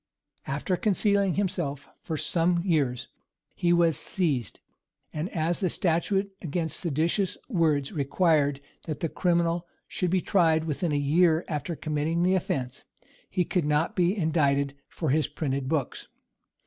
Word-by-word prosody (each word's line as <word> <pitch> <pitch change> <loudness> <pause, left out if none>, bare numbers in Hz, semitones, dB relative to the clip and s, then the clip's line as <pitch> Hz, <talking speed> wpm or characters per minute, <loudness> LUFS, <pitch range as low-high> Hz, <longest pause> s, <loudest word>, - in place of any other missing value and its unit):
After 145 +7 -1
concealing 200 -2 +2
himself 165 -8 -2
for 160 - -4
some 170 +2 +1
years, 140 -9 0 0.5
he 175 - +1
was 170 -2 +4
seized; 145 - -1 0.5
and 155 +4 -3
as 165 +1 -1
the 185 - +1
statute 195 +4 0
against 165 0 -2
seditious 170 +4 0
words 155 - +1
required 145 -2 +1 0.3
that 155 -3 -4
the 165 - 0
criminal 170 0 +1 0.2
should 180 - -1
be 185 +2 +2
tried 165 -4 +2
within 160 +1 -2
a - - +1
year 160 +3 +3
after 150 +1 -3
committing 155 +3 -1
the 185 +1 +3
offence, 130 -9 -2 0.5
he 180 - 0
could 175 -2 0
not 150 +2 +1
be 180 +3 +2
indicted 140 -5 +1
for 155 -6 -2
his 150 -1 +2
printed 140 -3 -3
books. 145 -5 -2
165 Hz, 140 wpm, -27 LUFS, 145-180 Hz, 0.5 s, was